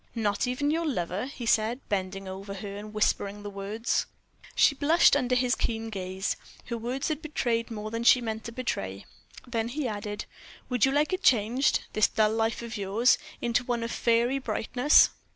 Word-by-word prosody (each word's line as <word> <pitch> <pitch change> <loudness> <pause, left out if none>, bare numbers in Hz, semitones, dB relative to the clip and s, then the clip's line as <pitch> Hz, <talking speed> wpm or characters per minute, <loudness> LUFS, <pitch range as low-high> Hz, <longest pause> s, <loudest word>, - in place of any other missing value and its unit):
"Not 210 +1 0
even 285 +4 0
your 330 +1 0
lover?" 190 - -2
he 255 -3 -7
said, 225 +2 +2
bending 195 -1 -3
over 195 +1 -7
her 200 +1 -6
and 210 +1 -8
whispering 205 -1 0
the 205 - -6
words. 205 +4 -2 0.5
She - - +5
blushed 300 +4 +4
under 250 -3 +1
his 250 0 +2
keen 225 -2 -2
gaze. 190 0 -3 0.3
Her 235 - -4
words 250 +6 -2
had 310 0 -2
betrayed 240 -7 -1
more 215 -1 -5
than 230 +1 -3
she 250 - +7
meant 220 -2 -4
to 235 - -5
betray. 100 - -4 0.4
Then 230 -2 -2
he 270 +2 -2
added: 210 -1 -4 0.4
"Would 245 -2 +3
you 270 - +1
like 295 +5 +1
it 370 - -1
changed 245 - +3
this 215 - +4
dull 215 0 +2
life 225 +1 0
of 230 -1 -5
yours 205 +5 +3 0.2
into 240 +1 +1
one 240 -2 -2
of 230 - -3
fairy 240 +3 +2
brightness?" 250 +4 +4
230 Hz, 185 wpm, -28 LUFS, 205-250 Hz, 0.5 s, she